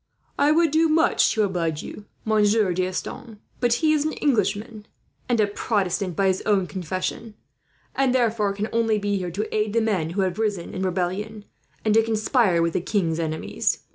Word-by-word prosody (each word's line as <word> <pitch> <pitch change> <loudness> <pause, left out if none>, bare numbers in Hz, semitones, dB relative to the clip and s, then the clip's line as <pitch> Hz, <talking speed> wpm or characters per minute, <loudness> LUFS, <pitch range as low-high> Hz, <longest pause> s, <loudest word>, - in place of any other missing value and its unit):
"I 290 +1 +4
would 325 0 +3
do 320 +1 +3
much 320 +2 +3
to 215 - +2
oblige 170 -6 -1
you, 210 - -9 0.2
Monsieur 215 -2 +3
D'Estanges; 185 +6 -4 0.2
but 240 -1 +2
he 310 - +5
is 300 -2 +1
an 310 - -2
Englishman 210 -3 -1 0.4
and 240 -2 +2
a 215 - +5
Protestant, 195 -3 -1
by 195 - +1
his 190 -1 +1
own 200 -3 +1
confession, 185 +4 -4 0.6
and 270 -2 +2
therefore 225 -4 +1
can 205 +2 -3
only 225 -2 +2
be 205 -1 -1
here 180 -1 -3
to 205 +6 -4
aid 210 -1 0
the 230 - +3
men 195 -8 0
who - - +3
have 185 +1 -1
risen 205 -6 -2
in 185 - -4
rebellion, 190 +3 -2 0.4
and 215 - +3
to 225 - +6
conspire 220 -5 +2
with 165 -1 0
the - - 0
king's 170 -4 -1
enemies. 160 -1 -2
210 Hz, 185 wpm, -24 LUFS, 185-225 Hz, 0.6 s, to